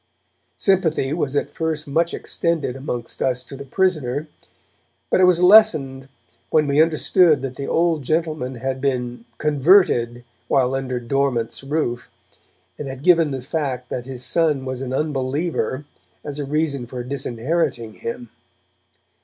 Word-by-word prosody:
Sympathy 165 -8 +1
was 145 -4 -2
at - - -1
first 160 -1 -3
much 165 +4 +1
extended 160 -7 -2
amongst 125 -3 -5
us 125 -1 0
to 135 - -10
the 140 - -8
prisoner. 150 -4 0 0.8
But - - +4
it - - +7
was 180 -1 +4
lessened 155 -10 +5 0.4
when 155 -1 +3
we 145 +1 +3
understood 160 -2 +3
that 130 -1 -4
the 140 - -5
old 165 -2 +1
gentleman 155 -3 -1
had 130 +2 -3
been 125 -3 -2
'converted' 145 -6 +3 0.2
while 130 -1 +2
under 130 -2 -2
Dormant's 125 -1 -1
roof, 135 -4 -2 0.7
and 150 - -4
had 135 0 -7
given 170 -3 +5
the 135 -2 -4
fact 130 -4 -3
that 125 0 -5
his 130 -1 -6
son 155 -5 +1
was 130 -1 -4
'an 130 -1 -4
unbeliever' 145 -1 -2 0.4
as 145 0 -6
a 145 - -2
reason 140 -3 -1
for 125 0 -6
disinheriting 130 -1 -2
him. 115 0 -7
140 Hz, 145 wpm, -21 LUFS, 130-160 Hz, 0.8 s, it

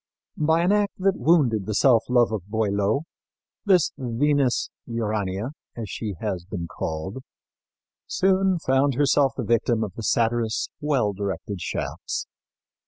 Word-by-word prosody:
By 160 +2 +3
an 180 - +3
act 205 -1 +2
that 195 0 +2
wounded 130 - +3
the 110 - -2
self 120 -3 +4
love 120 -2 +4
of 100 -4 -4
Boileau 105 +3 0 0.6
this 185 -5 +4
Venus 135 +1 +1 0.2
Urania, 110 -1 -2 0.3
as 110 -4 -5
she 105 -4 -4
has 95 -5 -3
been 90 -2 -5
called, 80 +9 -4 0.9
soon 190 -1 +2
found 135 -3 +2
herself 140 -1 +3
the 130 - -2
victim 115 0 +1
of 105 - -5
the - - -7
satirist's 115 0 +1
well 135 -9 +1
directed 100 -1 -4
shafts. 85 - -3
115 Hz, 135 wpm, -24 LUFS, 105-145 Hz, 0.9 s, self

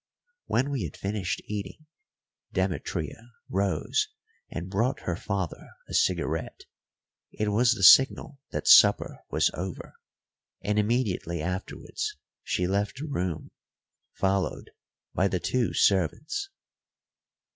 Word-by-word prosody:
When 135 +3 +1
we 135 -4 -1
had 80 - -8
finished 100 -2 -3
eating, 105 +8 -6 0.7
Demetria - - -3
rose 425 - 0 0.4
and 85 +1 -5
brought 115 +8 0
her 90 - -2
father 95 -3 -4 0.2
a - - -9
cigarette. - - 0 0.7
It 105 0 -2
was 115 +4 +4
the 95 - -4
signal 135 +6 +6
that - - -4
supper - - +6
was - - +2
over; 90 +1 -6 0.7
and 105 +1 0
immediately 105 -6 0
afterwards 90 +3 -4 0.2
she 90 - -1
left 100 +4 -1
the 145 - -5
room, 90 - -3 0.6
followed 95 0 -1 0.4
by 95 - +2
the 90 -2 -1
two 125 +6 0
servants. 100 - +1
100 Hz, 115 wpm, -27 LUFS, 90-125 Hz, 0.7 s, signal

